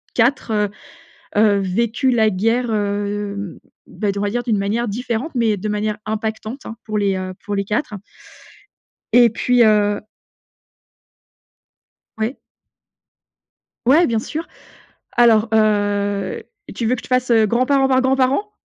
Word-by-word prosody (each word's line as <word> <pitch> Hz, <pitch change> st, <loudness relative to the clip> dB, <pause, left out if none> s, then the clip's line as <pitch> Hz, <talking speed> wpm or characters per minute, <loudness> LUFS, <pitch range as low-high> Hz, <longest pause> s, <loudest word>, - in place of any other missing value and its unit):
4, 245 Hz, 0 st, +1 dB
heu, 210 Hz, -1 st, +1 dB, 0.7 s
heu, 210 Hz, -2 st, +4 dB
vécu 230 Hz, +7 st, 0 dB
la 220 Hz, -3 st, +3 dB
guerre, 225 Hz, +6 st, 0 dB
heu, 205 Hz, -2 st, -3 dB, 0.3 s
bah, 205 Hz, -2 st, -2 dB
d 200 Hz, -, -5 dB
on -, -, -2 dB
va 205 Hz, -, 0 dB
dire 240 Hz, +2 st, -1 dB
d'une 225 Hz, -4 st, +1 dB
manière 210 Hz, +5 st, -1 dB
différente 240 Hz, +6 st, -3 dB
mais 225 Hz, -4 st, +1 dB
de 210 Hz, +3 st, -4 dB
manière 210 Hz, 0 st, -1 dB
impactante, 220 Hz, +4 st, -4 dB
hein, 225 Hz, -, -7 dB
pour 215 Hz, -1 st, -2 dB
les, 200 Hz, -2 st, +1 dB
heu, 185 Hz, 0 st, -4 dB
pour 205 Hz, -, -3 dB
les 200 Hz, -, -1 dB
4 210 Hz, +3 st, -2 dB, 1.2 s
et 240 Hz, -1 st, +7 dB
puis, 245 Hz, +2 st, +2 dB
heu 205 Hz, -1 st, +3 dB, 2.2 s
Ouais. 220 Hz, +5 st, -2 dB, 1.5 s
Ouais, 310 Hz, +7 st, +5 dB
bien 225 Hz, -2 st, 0 dB
sûr. 315 Hz, +8 st, -5 dB, 0.7 s
Alors, 230 Hz, -2 st, +5 dB
heu, 205 Hz, -2 st, +1 dB, 0.3 s
tu 225 Hz, +2 st, -2 dB
veux 250 Hz, -, +2 dB
que -, -, -6 dB
je -, -, -18 dB
te -, -, -12 dB
fasse, 255 Hz, -1 st, +1 dB
heu, 225 Hz, -2 st, +5 dB
grand 240 Hz, +4 st, +1 dB
parent 275 Hz, -1 st, +3 dB
par 260 Hz, 0 st, +3 dB
grand 260 Hz, +1 st, +2 dB
parent? 275 Hz, +11 st, +1 dB
220 Hz, 150 wpm, -19 LUFS, 205-245 Hz, 2.2 s, et